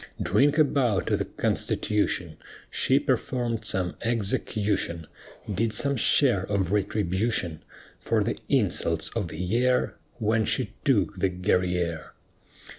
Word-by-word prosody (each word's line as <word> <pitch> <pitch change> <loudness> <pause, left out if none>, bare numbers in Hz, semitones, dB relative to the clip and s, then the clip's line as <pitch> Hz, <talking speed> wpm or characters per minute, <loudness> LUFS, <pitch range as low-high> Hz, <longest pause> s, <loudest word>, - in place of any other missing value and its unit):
Drink 145 +2 +2
a 155 - +7
bout 125 -8 +1
to - - +1
the - - -2
Constitution! 90 -6 -1 0.3
She 130 - +2
performed 125 -4 -1
some 90 -2 -2
execution, 105 -6 -1 0.5
Did 110 +3 0
some 140 0 0
share 120 -4 +4
of 95 -3 0
retribution 100 -3 0 0.4
For 110 -2 +1
the 115 - -3
insults 85 - +1
of 110 -6 -3
the 80 - -8
year 120 +8 +1 0.2
When 110 0 +1
she - - -1
took - - +2
the 95 - +2
Guerrière. 90 -3 -1
105 Hz, 120 wpm, -26 LUFS, 90-120 Hz, 0.5 s, a